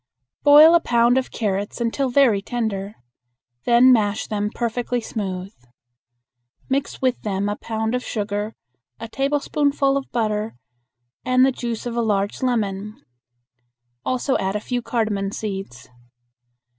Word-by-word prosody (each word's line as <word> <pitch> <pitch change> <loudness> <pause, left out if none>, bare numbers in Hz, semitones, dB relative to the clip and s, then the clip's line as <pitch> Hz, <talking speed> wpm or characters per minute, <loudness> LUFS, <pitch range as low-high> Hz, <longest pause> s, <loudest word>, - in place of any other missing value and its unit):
Boil 300 +3 +8
a 340 - +6
pound 240 -4 +3
of 260 - -5
carrots 205 -1 -3
until 240 +3 0
very 245 -6 +4
tender. 210 -2 -3 0.7
Then 245 +2 +6
mash 210 -2 +1
them 210 -1 -2
perfectly 240 +2 -2
smooth. 195 -4 -5 1.2
Mix 275 0 -2
with 255 -1 +1
them 200 -1 -2
a 205 - -1
pound 220 +1 -3
of 250 0 -1
sugar, 210 0 -3 0.4
a 230 - -6
tablespoonful 280 +1 0
of 275 - -6
butter, 215 - -1 0.7
and 255 0 +4
the 270 - +3
juice 235 -3 -5
of 240 -1 -4
a 235 - +1
large 205 -3 -1
lemon. 210 -4 -2 1.0
Also 255 +1 0
add 190 +1 -1
a - - 0
few 245 +3 -3
cardamon 215 -5 -1
seeds. 195 - -6
230 Hz, 130 wpm, -22 LUFS, 205-255 Hz, 1.2 s, Boil